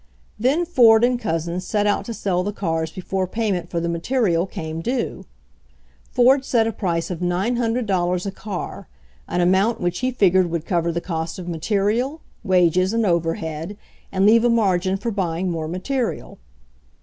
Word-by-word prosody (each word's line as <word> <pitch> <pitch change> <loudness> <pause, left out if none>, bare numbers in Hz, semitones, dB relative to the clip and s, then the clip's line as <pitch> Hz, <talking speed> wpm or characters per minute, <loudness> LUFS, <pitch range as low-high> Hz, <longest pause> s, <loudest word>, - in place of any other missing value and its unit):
Then 280 +10 +2
Ford 235 -9 +5
and 245 0 +2
Couzens 170 -4 -2
set 210 -1 0
out 205 -1 +1
to 230 - -5
sell 180 -4 0
the 205 +3 -2
cars 165 -5 -2
before 185 +1 -3
payment 190 -4 -2
for 170 - -2
the 170 - -2
material 175 0 0
came 160 -2 -5
due. 240 +6 -3 0.8
Ford 260 +2 +4
set 235 -4 +2
a 225 - 0
price 175 -5 -2
of 175 - -4
$900 190 -1 0
a 195 - -2
car, 195 -1 -6 0.4
an 180 - 0
amount 190 +6 +2
which 175 0 -1
he 255 - 0
figured 190 -7 +3
would 165 -1 -3
cover 170 -2 0
the 170 +1 -3
cost 165 -2 -4
of 180 -2 -7
material, 210 - 0 0.2
wages 185 0 +3
and 230 -1 +1
overhead 165 +1 -2 0.3
and 190 +1 +2
leave 225 +2 +6
a 240 - +4
margin 190 -5 +2
for 230 +4 -3
buying 180 -2 -1
more 160 -2 -3
material. 230 - -3
190 Hz, 165 wpm, -22 LUFS, 170-225 Hz, 0.8 s, leave